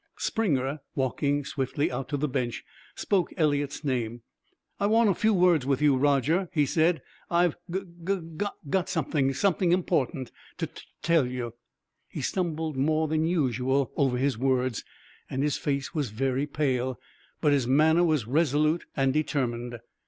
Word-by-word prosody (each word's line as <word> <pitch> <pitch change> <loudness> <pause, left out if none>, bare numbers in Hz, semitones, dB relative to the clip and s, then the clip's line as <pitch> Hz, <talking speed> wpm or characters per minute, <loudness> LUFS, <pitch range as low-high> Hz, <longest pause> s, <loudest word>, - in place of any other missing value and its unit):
Springer, 145 - 0 0.2
walking 140 +2 0
swiftly 140 +2 -1
out 135 -1 -4
to 145 - -1
the 150 +2 0
bench, 120 -3 -2 0.3
spoke 190 -4 0
Eliot's 145 -3 0
name. 120 -4 -2 0.6
"I 200 - +2
want 220 0 +4
a - - +2
few 220 +5 +2
words 180 -7 +4
with 135 0 +1
you, 150 -2 +4
Roger," 145 +6 +2
he 150 -3 +2
said; 160 +4 +2 0.3
"I've 175 -1 +3
gug 175 -2 -6 0.4
gug 205 0 0 0.2
got 185 +4 0
something 145 -4 0
something 185 -1 +2
important 170 -6 0 0.3
to - - -1
to - - -12 0.2
tell 165 -6 +3
you." 125 -2 -4 0.5
He - - -6
stumbled 160 -4 -2
more 155 +3 +2
than 155 +1 +1
usual 130 -5 +1
over 135 -4 +2
his 130 -2 0
words, 130 -2 +1 0.5
and 135 +1 -1
his 150 -2 +1
face 140 0 -2
was 150 -7 -1
very 135 +5 -1
pale; 130 -4 -1 0.4
but 150 -3 +3
his 135 -4 +1
manner 155 +6 +4
was 155 -8 +2
resolute 150 +4 +2
and 135 -1 +2
determined. 120 -6 -1
145 Hz, 155 wpm, -27 LUFS, 130-165 Hz, 0.6 s, want